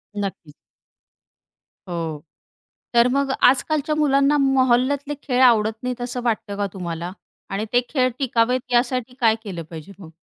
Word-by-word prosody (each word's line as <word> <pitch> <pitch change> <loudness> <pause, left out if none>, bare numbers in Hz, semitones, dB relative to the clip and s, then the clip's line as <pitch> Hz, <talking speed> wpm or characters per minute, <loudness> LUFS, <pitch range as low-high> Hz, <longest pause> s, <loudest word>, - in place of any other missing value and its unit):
नक्कीच. 195 -6 -5 1.3
हो. 165 -4 -4 0.7
तर 235 +1 +5
मग 275 0 0 0.2
आजकालच्या 300 +3 -1
मुलांना 280 -1 +3
मोहल्ल्या 265 0 +3
तले 285 +1 -6
खेळ 255 -2 0
आवडत 225 -3 +5
नाहीत 250 0 -4
असं 245 0 -3
वाटतं 220 -3 -2
का 205 0 -1
तुम्हाला? 175 -1 -5 0.4
आणि 195 +2 -2
ते 245 - +5
खेळ 255 -3 +2
टिकावेत 250 -1 +1
यासाठी 250 0 0
काय 225 -2 +4
केलं 180 -5 -5
पाहिजे 160 +3 -9
मग? 165 -4 -12
245 Hz, 140 wpm, -22 LUFS, 200-265 Hz, 1.3 s, तर